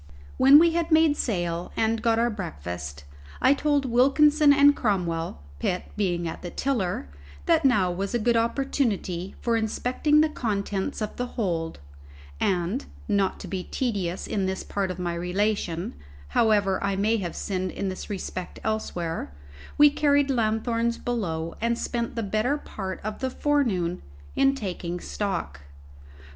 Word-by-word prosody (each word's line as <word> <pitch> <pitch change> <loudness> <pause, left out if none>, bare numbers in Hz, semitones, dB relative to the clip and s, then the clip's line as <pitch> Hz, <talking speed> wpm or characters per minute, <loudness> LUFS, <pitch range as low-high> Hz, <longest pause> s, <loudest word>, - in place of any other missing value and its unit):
When 270 +2 +8
we 335 +2 +6
had 335 0 -1
made 315 -2 +5
sail 175 -9 -2
and 225 0 +1
got 230 -1 +2
our 235 +1 +2
breakfast, 85 - -6 0.4
I 265 - +5
told 285 -1 +1
Wilkinson 285 +4 +5
and 285 +1 +6
Cromwell 170 - -1 0.2
(Pitt 180 - -2
being 175 -4 0
at 160 - -6
the 175 - -5
tiller) 195 - -1 0.4
that - - +3
now 205 -9 +4
was 195 +5 -3
a - - +4
good 235 +1 +2
opportunity 230 -7 -1
for 235 -1 +1
inspecting 250 +7 +1
the 310 - +4
contents 210 -4 -2
of 210 - -5
the 245 - -2
hold; 170 -7 -1 0.6
and 190 +7 0 0.2
(not 200 -2 +1
to - - -7
be 190 -2 -3
tedious 195 -8 -2
in 195 -2 -1
this 190 0 -3
part 195 -2 -2
of 180 - -4
my 175 -1 -2
relation, 180 0 -1 0.4
however 205 - +2
I 200 -1 0
may 215 +4 +2
have 180 -5 -4
sinned 185 -2 -2
in 195 +2 -3
this 185 - -6
respect 185 -2 -5
elsewhere) 175 - -3 0.5
we 295 0 +7
carried 285 -1 +3
lanthorns 230 0 0
below, 170 -9 -3
and 235 +1 +1
spent 235 -1 -3
the 230 - -2
better 215 +8 0
part 190 -9 -6
of 215 0 -4
the 260 - -1
forenoon 235 - 0 0.3
in 275 0 +3
taking 180 -6 -4
stock. 175 - -3
210 Hz, 155 wpm, -26 LUFS, 180-250 Hz, 0.6 s, When